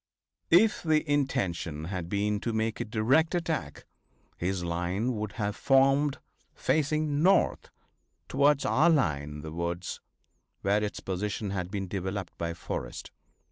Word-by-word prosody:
If 205 +6 +5
the 155 -1 +2
intention 100 - -1
had 90 0 -4
been 105 +1 0
to 115 +1 -3
make 110 0 -1
a 120 - -2
direct 125 - +2
attack, 160 - -3 0.5
his 90 0 -2
line 90 +8 -1
would 105 -2 -4
have 105 -2 -2
formed 135 +1 +3 0.4
facing 155 -1 +1
north 190 +2 +3 0.6
towards 140 0 +3
our 155 +5 +4
line 95 - +2
in 75 0 -8
the 80 +1 -7
woods, 85 +2 -4 0.6
where 100 +2 +2
its 105 - -4
position 100 +2 -3
had 90 -2 -3
been 100 -1 -3
developed 95 0 -4
by 85 0 -2
Forrest. 60 -7 -6
105 Hz, 140 wpm, -29 LUFS, 90-140 Hz, 0.6 s, If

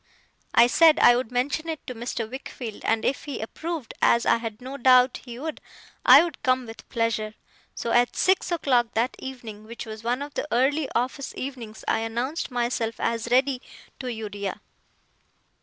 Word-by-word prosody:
I - - +8
said 310 +5 +5
I 240 - +7
would 245 -1 -2
mention 285 +6 -1
it 320 -2 -5
to 250 - -5
Mr. 235 -1 -4
Wickfield, 245 -3 -7
and 225 - +1
if 260 - -1
he 285 -4 -5
approved, 315 +4 -5
as 235 - +4
I - - +4
had 225 -2 -6
no 260 +2 -7
doubt 255 -1 +4
he 240 -2 -8
would, 310 +4 -5 0.4
I - - +9
would 340 -5 -6
come 255 -1 +1
with 225 0 -12
pleasure. 220 -2 -1 0.4
So, 235 - -3
at 240 +1 +3
six 375 -1 +2
o'clock 250 -8 +1
that 235 +3 +1
evening, 235 -5 -8
which 235 +2 -8
was 220 0 -8
one 245 +4 -1
of 290 0 -9
the - - -3
early 270 +4 +2
office 255 +3 -2
evenings, 245 -5 -7
I - - +2
announced 240 +8 -3
myself 240 -2 -1
as 230 0 -1
ready, 260 +1 +2 0.4
to 255 -2 -4
Uriah. 205 -3 -5
245 Hz, 175 wpm, -25 LUFS, 230-270 Hz, 0.4 s, I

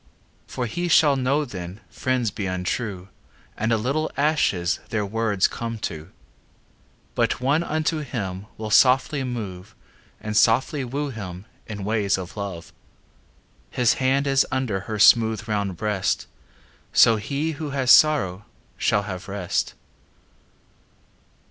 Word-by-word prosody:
For 125 - -3
he 175 +9 -3
shall 155 -4 +5
know 135 +3 +1
then 95 -4 -8
Friends 130 -4 -1
be 100 -1 -4
untrue 95 +1 -3 0.5
And 110 +2 -1
a 115 - +3
little 140 +8 -1
ashes 140 - +1
Their 105 -3 -1
words 105 -2 +1
come 115 -1 -5
to. 80 -7 -6 1.0
But - - 0
one 140 +6 +2
unto 155 -1 -1
him 100 -9 -5
Will 110 -1 -5
softly 130 +5 +4
move 105 -5 -6 0.4
And 105 0 -5
softly 130 +7 +3
woo 140 +3 -3
him 95 -5 -7 0.2
In 105 -3 -6
ways 105 -1 +1
of 90 -2 -7
love. 100 -5 -6 1.0
His 125 -2 +2
hand 135 +2 +2
is 135 -1 +3
under 130 -7 -1
Her 110 - -2
smooth 110 +1 +5
round 100 -4 -2
breast; 105 -3 -1 0.7
So 115 -1 +6
he 140 +8 -2
who 155 -1 -5
has 135 -3 +2
sorrow 105 -11 +4 0.3
Shall 105 - +1
have 95 -3 -7
rest. 95 -3 -2
110 Hz, 130 wpm, -23 LUFS, 100-135 Hz, 1.0 s, So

